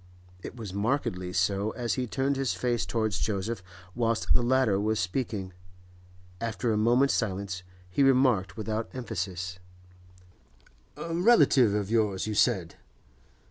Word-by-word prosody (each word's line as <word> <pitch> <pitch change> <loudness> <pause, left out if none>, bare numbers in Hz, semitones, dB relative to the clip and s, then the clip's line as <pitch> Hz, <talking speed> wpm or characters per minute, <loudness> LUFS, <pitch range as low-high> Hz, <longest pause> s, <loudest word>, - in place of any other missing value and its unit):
It - - -8
was 110 -6 -7
markedly 100 -4 -1
so 100 +3 +1
as 120 -2 -2
he 125 -1 -2
turned 135 +4 0
his 135 -2 -1
face 120 -7 -1
towards 110 -3 -1
Joseph 105 0 -2 0.3
whilst 115 -2 +1
the - - +3
latter 120 -5 +2
was 110 +1 0
speaking. 95 -1 -3 0.9
After 115 0 -1
a - - +1
moment's 120 +6 +3
silence 95 -3 -2 0.3
he 90 +9 -1
remarked, 130 -8 +3
without 110 +1 -3
emphasis: 95 -6 -4 1.4
'A 165 - -5
relative 165 - +5
of 105 0 -2
yours, 105 -5 +1
you 110 - -2
said? 100 -6 +1
110 Hz, 135 wpm, -28 LUFS, 95-125 Hz, 1.4 s, relative